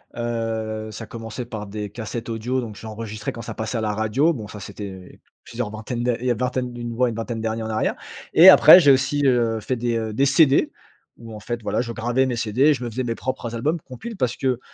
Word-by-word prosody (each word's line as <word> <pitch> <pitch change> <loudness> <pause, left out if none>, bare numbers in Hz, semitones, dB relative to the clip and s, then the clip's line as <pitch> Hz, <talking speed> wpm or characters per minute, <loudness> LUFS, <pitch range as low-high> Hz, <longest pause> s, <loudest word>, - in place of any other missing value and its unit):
Heu 110 -2 -3
ça 110 +1 -7
commençait 115 +2 -7
par 110 -3 -7
des 105 0 -5
cassettes 115 +2 -6
audio, 120 +3 -2
donc 110 -4 -7
j'enregistrais 110 0 -6
quand 115 - -8
ça 115 -1 -6
passait 110 +2 -3
à 110 - -1
la 105 -1 -1
radio. 110 +10 +1
Bon, 110 -7 -7
ça, 105 0 -9
c'était 95 -1 -9 0.2
plusieurs 115 -2 -4
vingtaines 110 +3 -5
d'a 120 -1 +1
il 125 - -6
y 125 - +2
a - - +4
une 115 - -8
vingtaine 125 -1 -2
d'une 120 -1 -5
ouais, 125 +1 +2
une 110 - -5
vingtaine 115 0 -4
d'années 110 0 -2
en 110 - -4
arrière 110 0 0 0.4
et 175 +4 +10
après, 185 - +10
j'ai 145 -5 +6
aussi, 135 +2 +2
heu, 120 -4 +2
fait 125 +5 -2
des, 120 -1 -1
heu, 110 -1 -3
des 135 +6 +2
CD. 140 0 +4 0.5
Où 115 -2 -10
en - - -8
fait, 120 +2 -4
voilà, 115 - -1
je 115 - -5
gravais 120 +3 0
mes 125 -2 -1
CD, 115 +2 -2
et 150 +2 +6
je 130 - -5
me 120 - -3
faisais 125 +3 -3
mes 115 -2 -2
propres 130 -3 -4
albums, 150 +9 -1
compiles 215 - -9
parce 125 -1 -1
que 130 -2 0
115 Hz, 250 wpm, -22 LUFS, 110-125 Hz, 0.5 s, et